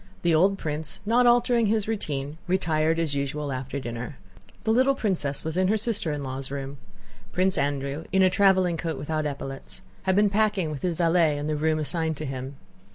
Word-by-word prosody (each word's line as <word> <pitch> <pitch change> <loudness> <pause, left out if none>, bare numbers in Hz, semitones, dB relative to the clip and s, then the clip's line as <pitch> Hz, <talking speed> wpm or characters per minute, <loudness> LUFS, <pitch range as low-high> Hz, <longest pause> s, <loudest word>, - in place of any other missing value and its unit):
The 170 -1 +3
old 190 +5 +4
prince, 155 -3 -4
not 240 +3 +4
altering 240 -1 +4
his 215 0 +1
routine, 150 -8 -3
retired 160 -3 +1
as 165 -3 0
usual 140 +1 -2
after 130 +1 -4
dinner. 125 +2 -6 0.5
The 220 - +1
little 260 +4 +4
princess 175 - -1
was 160 +2 -3
in 185 0 +3
her 215 +3 +2
sister 210 -7 0
in 145 -1 -3
law's 130 0 -4
room. 140 0 -5 0.5
Prince 185 +1 +2
Andrew 140 +2 -2
in 190 0 +4
a 185 - +6
traveling 185 -3 +3
coat 165 -3 -3
without 155 +1 -2
epaulettes 140 +5 -7 0.2
had 190 -1 +2
been 205 0 +4
packing 205 -6 +1
with 145 - -6
his 175 -2 -1
valet 165 -2 +3
in 145 - -3
the 155 0 -1
rooms 155 +1 +1
assigned 160 0 -1
to 155 - -4
him. 135 0 -5
160 Hz, 195 wpm, -26 LUFS, 145-190 Hz, 0.5 s, a